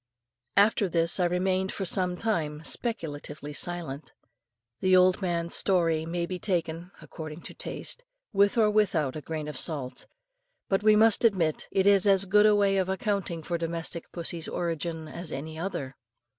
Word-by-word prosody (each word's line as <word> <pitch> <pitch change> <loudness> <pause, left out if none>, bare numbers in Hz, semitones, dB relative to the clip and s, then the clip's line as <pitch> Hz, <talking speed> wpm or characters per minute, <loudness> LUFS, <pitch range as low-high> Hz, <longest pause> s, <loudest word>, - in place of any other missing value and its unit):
After 200 -1 +4
this 170 +2 +1
I 180 - +3
remained 185 +2 0
for 195 - -4
some 180 -1 +1
time 160 -9 -2
speculatively 150 - -3
silent. 160 -3 -3 0.7
The 185 -1 +4
old 185 +2 +4
man's 170 -2 -1
story 165 -4 +2
may 170 +1 -2
be 180 +1 -5
taken 170 -2 -2
according 155 0 -8
to - - -9
taste - - -3 0.3
with 200 +2 +3
or 215 -2 +4
without 190 -10 +1
a 155 - -5
grain 155 -1 -5
of 150 - -5
salt; 140 -6 -4 0.6
but 195 0 +2
we 215 0 +5
must 220 +1 +5
admit 185 -9 +1
it 190 -1 +1
is 200 -1 +5
as 195 -1 +5
good 210 +2 +5
a 210 - +5
way 200 -1 +3
of 190 -1 0
accounting 190 -4 -2
for 170 +1 -3
domestic 165 0 -4
pussy's 170 -1 -2
origin 165 -1 -3
as 170 +2 -7
any 155 +3 -6
other. 140 -7 -4
175 Hz, 165 wpm, -27 LUFS, 160-195 Hz, 0.7 s, we